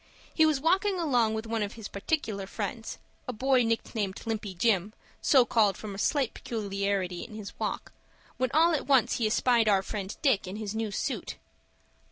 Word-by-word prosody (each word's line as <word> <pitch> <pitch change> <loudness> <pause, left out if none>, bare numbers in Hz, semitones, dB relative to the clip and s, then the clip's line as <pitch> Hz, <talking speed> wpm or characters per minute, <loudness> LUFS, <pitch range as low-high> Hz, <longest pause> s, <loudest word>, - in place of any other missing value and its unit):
He 315 -1 +5
was 305 -3 +2
walking 375 +5 +2
along 245 -9 +2
with 220 +1 -4
one 225 0 -2
of 205 -1 -2
his 225 -3 -7
particular 200 -3 -2
friends, 220 +2 -5 0.3
a 250 - -3
boy 260 +3 +3
nicknamed 225 -3 -2
Limpy 215 -4 -3
Jim, 200 +1 +1 0.3
so 260 -4 +5
called 210 -5 +3
from 210 -2 -7
a 195 - -7
slight 270 +1 +1
peculiarity 200 -4 -2
in 215 - -10
his 210 -2 -7
walk, - - -3 0.5
when 255 0 +1
all 330 +3 +4
at 300 - -1
once 265 -4 +4
he 225 - +1
espied 230 0 +3
our 195 -2 +3
friend 200 -1 -5
Dick 245 -10 +3
in 185 - -5
his 210 -1 -4
new 220 -1 -2
suit. 200 - -3
220 Hz, 185 wpm, -28 LUFS, 200-255 Hz, 0.5 s, He